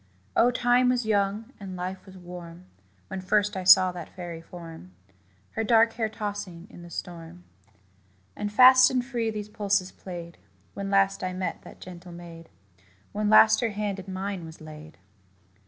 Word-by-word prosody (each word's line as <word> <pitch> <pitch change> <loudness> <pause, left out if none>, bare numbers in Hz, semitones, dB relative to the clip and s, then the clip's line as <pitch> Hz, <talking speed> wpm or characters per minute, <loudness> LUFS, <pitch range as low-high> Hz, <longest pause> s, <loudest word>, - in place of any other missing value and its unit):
Oh, 240 - +5
Time 245 +1 +3
was 250 -2 0
young, 210 +3 -1
and 190 -2 -7
Life 185 +2 -6
was 190 0 -13
warm, 175 -1 -10 0.4
When 185 - -6
first 210 +2 +1
I 190 - -3
saw 185 0 +7
that 175 -2 -8
fairy 175 -3 -8
form, 165 - -11 0.6
Her 225 - -2
dark 225 0 +4
hair 220 -2 -2
tossing 205 -5 -6
in - - -12
the 175 - -11
storm. 170 0 -8 0.9
And 205 - -4
fast 255 +3 +8
and 250 -1 -1
free 240 -4 -2
these 210 -1 -5
pulses 200 -3 -1
played, 170 -2 -9 0.3
When 200 0 -5
last 195 -1 +2
I 185 0 -2
met 185 0 -4
that - - -14
gentle 180 -1 -10
maid 170 -1 -11 0.6
When 210 0 -1
last 215 0 +7
her 235 - 0
hand 205 -1 -3
in 190 0 -8
mine 190 -1 -4
was 160 0 -11
laid. 155 0 -12
190 Hz, 170 wpm, -26 LUFS, 175-215 Hz, 0.9 s, fast